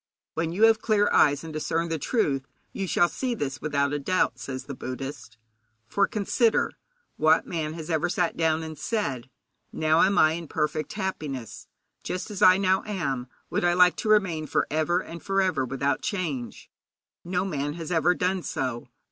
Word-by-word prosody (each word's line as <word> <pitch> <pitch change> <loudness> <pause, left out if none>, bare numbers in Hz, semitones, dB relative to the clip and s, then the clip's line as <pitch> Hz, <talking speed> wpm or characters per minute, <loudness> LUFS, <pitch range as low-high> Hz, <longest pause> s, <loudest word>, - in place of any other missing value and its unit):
When 165 0 -1
you 195 +6 0
have 225 -1 +6
clear 210 -2 +2
eyes 145 0 +4
and 160 -1 -7
discern 165 +2 -1
the 160 -1 -2
truth, 140 - 0 0.3
you 195 -2 -3
shall 175 - +3
see 250 +5 -3
this 135 - -4
without 145 -1 0
a 145 - -1
doubt, 185 +6 0
says 130 -1 -5
the 140 - -7
Buddhist. 130 -3 -7 0.5
For 200 +11 +1
consider, 220 +2 +1 0.5
What 155 +1 +4
man 155 -3 -3
has 165 0 -6
ever 160 +2 +1
sat 175 -1 0
down 160 -1 +1
and 160 -2 -8
said: 140 - -2 0.4
'Now 155 +1 +2
am 195 +1 +3
I 155 - +6
in 165 0 -5
perfect 155 0 -2
happiness; 150 - -5 0.4
just 185 +4 -4
as 200 - -6
I 185 0 +7
now 190 -1 +2
am 140 -11 -2 0.2
would - - 0
I 175 0 +3
like 180 0 +5
to 220 - -3
remain 180 -8 +2
for - - +1
ever 160 +4 +1
and 170 -2 -9
for 195 0 0
ever 180 -9 +1
without 135 +2 -1
change'? 155 - -4 0.5
No 180 +1 -1
man 145 -5 -2
has 165 0 -6
ever 175 +1 +3
done 185 +1 0
so. 125 -6 -3
160 Hz, 180 wpm, -26 LUFS, 145-185 Hz, 0.5 s, I